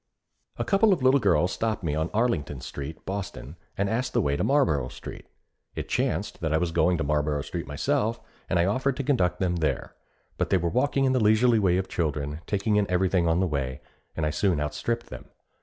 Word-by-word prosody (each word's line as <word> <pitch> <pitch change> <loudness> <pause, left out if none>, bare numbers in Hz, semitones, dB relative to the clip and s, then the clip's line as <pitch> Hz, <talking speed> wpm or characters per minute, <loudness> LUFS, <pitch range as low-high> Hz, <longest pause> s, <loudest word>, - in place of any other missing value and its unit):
A - - -2
couple 200 +1 +4
of 160 - -2
little 130 +2 +5
girls 90 - +2
stopped 110 -3 -2
me 80 -3 -1
on 80 +2 -1
Arlington 105 - 0
Street, 70 +5 -7
Boston, 95 -7 -5 0.2
and 100 - +1
asked 125 +4 -1
the - - +3
way 70 -1 0
to - - -1
Marlboro 80 - +2
Street. - - -10 0.5
It - - -4
chanced - - -1
that 80 -2 -1
I 80 - +3
was 85 0 -1
going 85 +2 +2
to 80 - -1
Marlboro 75 0 0
Street - - -5
myself, 105 - 0 0.3
and - - +2
I 85 - +3
offered 130 +6 0
to 140 - -2
conduct 120 -10 +1
them 90 -2 0
there, 80 -3 -1 0.5
but - - 0
they 95 - +4
were 85 -1 0
walking 135 +5 +1
in 130 - +2
the 125 -4 +2
leisurely 110 +2 +4
way 90 -3 +3
of 95 0 -1
children, 75 -2 -2
taking 105 +1 +1
in 105 -1 +1
everything 90 -1 +2
on 85 +2 +2
the - - +3
way, 70 -5 -3 0.4
and 80 - 0
I 75 - 0
soon 85 +1 +1
outstripped 115 +11 -3
them. - - -8
90 Hz, 215 wpm, -26 LUFS, 75-115 Hz, 0.5 s, little